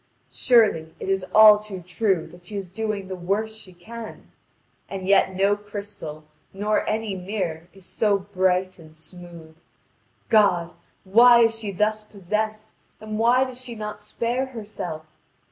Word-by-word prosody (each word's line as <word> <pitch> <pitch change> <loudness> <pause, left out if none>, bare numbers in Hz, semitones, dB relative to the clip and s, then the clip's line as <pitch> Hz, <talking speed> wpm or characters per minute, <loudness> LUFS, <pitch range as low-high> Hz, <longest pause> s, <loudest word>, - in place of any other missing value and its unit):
Surely, 205 -10 +2
it - - -6
is 195 -1 0
all 215 +1 +7
too 210 -3 -8
true 180 0 -1
that 175 +2 -16
she 210 - -9
is 195 -3 -6
doing 215 -2 -3
the 190 - -5
worst 200 +5 -2
she 195 -4 -10
can. 220 +6 -11 0.6
And 190 -1 -6
yet 190 -1 +3
no 200 +2 +3
crystal 205 -7 -8 0.3
nor 210 +2 0
any 215 -1 -2
mirror 180 -4 -4
is 195 -2 -16
so 205 +1 +1
bright 185 -1 -1
and 155 -1 -16
smooth. 170 -1 -13 0.7
God! 185 -6 +3 0.3
why 235 +5 +6
is 225 -1 +2
she 210 -3 -4
thus 215 +3 0
possessed, 215 +2 -4 0.3
and 215 0 -5
why 245 +3 +4
does 255 -1 -6
she 245 -2 -6
not 210 -1 -6
spare 240 +5 -2
herself? 205 -10 -7
205 Hz, 150 wpm, -23 LUFS, 185-220 Hz, 0.7 s, all